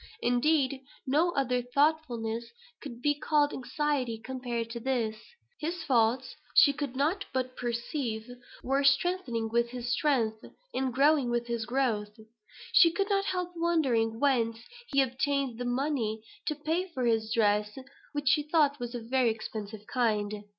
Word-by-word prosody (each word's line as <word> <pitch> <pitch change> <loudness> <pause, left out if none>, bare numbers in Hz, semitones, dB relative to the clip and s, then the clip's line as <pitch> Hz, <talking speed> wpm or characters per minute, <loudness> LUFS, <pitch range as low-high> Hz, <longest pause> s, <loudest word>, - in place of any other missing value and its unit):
Indeed, 265 +2 +2 0.2
no 300 +6 +3
other 250 -2 +1
thoughtfulness 245 -4 0 0.3
could 245 -4 -9
be 295 - +4
called 290 0 +1
anxiety 265 -3 -1
compared 240 -1 -4
to 235 - -5
this. 235 -3 -1 0.4
His 335 +2 -3
faults, 245 0 +1 0.2
she 285 - +7
could 280 -3 -4
not 320 +9 0
but 255 -1 -2
perceive, 235 -1 -3 0.4
were 270 +2 +1
strengthening 275 -5 +2
with 235 +1 +1
his 245 0 -4
strength, 230 -6 +1 0.3
and 260 -1 0
growing 280 0 +3
with 240 0 0
his 235 -2 -3
growth. 225 -5 -1 0.5
She 335 -3 +7
could 395 +4 -1
not 395 0 +2
help 360 -2 -2
wondering 265 -10 +1
whence 235 -5 +2 0.3
he 275 -1 +3
obtained 265 -1 -1
the 245 - -3
money 245 -4 -1 0.2
to 305 - 0
pay 320 +5 -1
for 260 -9 -3
his 225 -1 +1
dress, 210 -1 +2 0.3
which 290 -1 -4
she 300 0 +4
thought 295 -2 +2
was 240 0 -5
of 235 - -5
a - - -13
very 255 -1 +3
expensive 215 -1 -6
kind. 210 -4 -1
255 Hz, 150 wpm, -29 LUFS, 230-290 Hz, 0.5 s, she